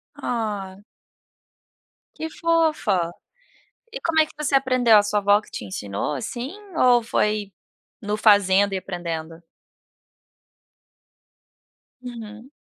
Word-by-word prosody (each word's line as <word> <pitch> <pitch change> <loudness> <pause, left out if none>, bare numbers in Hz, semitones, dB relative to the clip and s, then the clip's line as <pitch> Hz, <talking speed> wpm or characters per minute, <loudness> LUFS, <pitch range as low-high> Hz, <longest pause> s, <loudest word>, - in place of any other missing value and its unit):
Ah! 205 -4 -4 1.3
Que 320 - -5
fofa! 315 - +1 0.8
E - - -6
como 325 -1 +1
é 315 - +5
que - - -16
você 295 -2 -2
aprendeu, 255 -4 +4
a 205 - +6
sua 210 0 0
vó 205 +1 +4
que - - -19
te - - -7
ensinou, 100 +5 -4
assim, 240 - -5 0.3
ou 245 -1 +5
foi 210 -2 -1 0.5
no 210 0 -2
fazendo 200 -2 +4
e 190 - 0
aprendendo? 170 -3 -6 2.6
Uhum. 235 -1 -9
210 Hz, 110 wpm, -23 LUFS, 190-250 Hz, 2.6 s, a